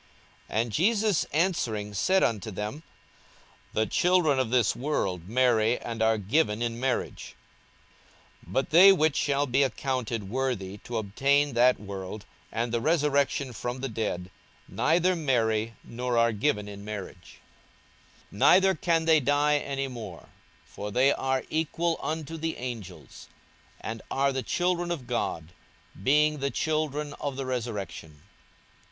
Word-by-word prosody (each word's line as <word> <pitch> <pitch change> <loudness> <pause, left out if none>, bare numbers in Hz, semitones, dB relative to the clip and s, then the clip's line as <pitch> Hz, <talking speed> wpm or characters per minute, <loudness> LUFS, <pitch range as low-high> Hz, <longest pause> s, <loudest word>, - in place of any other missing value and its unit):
42:020:034 110 - +1
And 115 -1 -4
Jesus 205 - +2
answering 120 - -1
said 185 - +2
unto 110 -1 0
them, 105 +9 -5 0.9
The 110 - +1
children 175 -2 +2
of 130 -3 0
this 120 -3 +2
world 95 - -2
marry, 120 -1 +3
and 115 -1 -6
are 110 0 +3
given 110 +2 +1
in 115 0 -3
marriage: 130 0 -3 1.1
42:020:035 85 - -14
But 135 - 0
they 185 +5 +9
which 155 -5 +2
shall 140 0 +1
be 135 +1 +1
accounted 125 -5 -1
worthy 105 -5 -2
to 120 +2 -5
obtain 140 +7 +1
that 125 +2 +4
world, 100 +1 -7 0.3
and 115 +1 -2
the 115 -1 0
resurrection 140 -3 +1
from 120 +3 -5
the 135 - -2
dead, 100 -5 -3 0.4
neither 175 +3 +2
marry, 115 -7 0
nor 120 0 -3
are 115 0 +4
given 105 -2 0
in 100 -1 -9
marriage: 100 -4 -8 0.9
42:020:036 100 - -10
Neither 190 +1 +6
can 165 -4 0
they 160 -1 +5
die 145 +2 +2
any 135 -1 -3
more: 110 -9 -9 0.4
for 105 - -7
they 130 +6 +3
are 130 -1 -1
equal 165 +1 0
unto 160 +1 -4
the 160 0 -3
angels; 120 -7 -8 0.5
and 110 +1 -6
are 140 0 +1
the 130 - -1
children 175 +3 0
of 165 -7 -3
God, 85 -9 -3 0.5
being 150 +5 +3
the 140 0 0
children 150 -1 -2
of 140 -2 -3
the 135 0 -4
resurrection. 105 - -5
130 Hz, 145 wpm, -27 LUFS, 110-150 Hz, 1.1 s, they